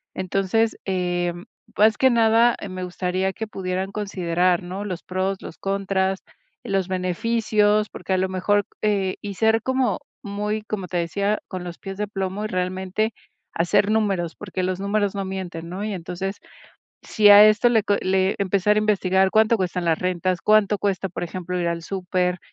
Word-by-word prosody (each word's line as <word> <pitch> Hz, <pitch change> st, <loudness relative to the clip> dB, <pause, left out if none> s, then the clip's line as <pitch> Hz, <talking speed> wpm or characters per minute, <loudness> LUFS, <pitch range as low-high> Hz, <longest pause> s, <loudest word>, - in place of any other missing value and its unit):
Entonces, 195 Hz, +4 st, 0 dB
eh, 175 Hz, -2 st, -1 dB, 0.4 s
más 215 Hz, 0 st, +5 dB
que 260 Hz, -, +5 dB
nada, 230 Hz, 0 st, +4 dB
me 185 Hz, 0 st, -5 dB
gustaría 185 Hz, +1 st, -2 dB
que 220 Hz, +3 st, -5 dB
pudieran 190 Hz, -1 st, -3 dB
considerar, 180 Hz, -3 st, 0 dB
¿no?, 185 Hz, +3 st, -5 dB
los 180 Hz, -4 st, -5 dB
pros, 190 Hz, +1 st, -2 dB
los -, -, -9 dB
contras, 195 Hz, -1 st, -1 dB, 0.4 s
los 195 Hz, -2 st, -1 dB
beneficios, 210 Hz, +3 st, +1 dB
porque 190 Hz, -, -4 dB
a -, -, +2 dB
lo 190 Hz, 0 st, 0 dB
mejor, 205 Hz, +2 st, +1 dB, 0.2 s
eh, 200 Hz, -3 st, +1 dB
y 205 Hz, -1 st, -5 dB
ser 220 Hz, +2 st, +3 dB
como 260 Hz, -1 st, 0 dB, 0.2 s
muy, 210 Hz, +1 st, -3 dB
como 205 Hz, -4 st, -4 dB
te 180 Hz, -, -3 dB
decía, 200 Hz, +5 st, 0 dB
con 185 Hz, -2 st, -6 dB
los 175 Hz, -1 st, -7 dB
pies 195 Hz, -1 st, -7 dB
de 210 Hz, 0 st, -2 dB
plomo 195 Hz, +1 st, -3 dB
y -, -, -1 dB
realmente 185 Hz, +3 st, -2 dB, 0.4 s
hacer 200 Hz, +5 st, +2 dB
números, 195 Hz, -6 st, 0 dB
porque 185 Hz, -2 st, -5 dB
los 185 Hz, 0 st, -1 dB
números 200 Hz, 0 st, 0 dB
no 195 Hz, -1 st, -2 dB
mienten, 180 Hz, -3 st, -6 dB
¿no?, 185 Hz, +3 st, -5 dB
y 215 Hz, -, -3 dB
entonces, 190 Hz, +2 st, -5 dB, 0.7 s
si 210 Hz, -2 st, +3 dB
a 205 Hz, +1 st, +10 dB
esto 215 Hz, +3 st, +4 dB
le 225 Hz, -3 st, +3 dB
co 205 Hz, -, +2 dB
le 190 Hz, +1 st, +1 dB
empezar 200 Hz, +1 st, +2 dB
a -, -, +4 dB
investigar 190 Hz, -3 st, +2 dB
¿cuánto 220 Hz, +2 st, +4 dB
cuestan 180 Hz, -1 st, -2 dB
las 165 Hz, 0 st, +2 dB
rentas, 180 Hz, 0 st, -1 dB
cuánto 210 Hz, -1 st, +3 dB
cuesta, 195 Hz, -1 st, -1 dB
por 175 Hz, -, -4 dB
ejemplo, 180 Hz, +1 st, -4 dB
ir 175 Hz, -, -1 dB
al 170 Hz, 0 st, -3 dB
súper?, 180 Hz, 0 st, -1 dB
190 Hz, 175 wpm, -23 LUFS, 185-210 Hz, 0.7 s, a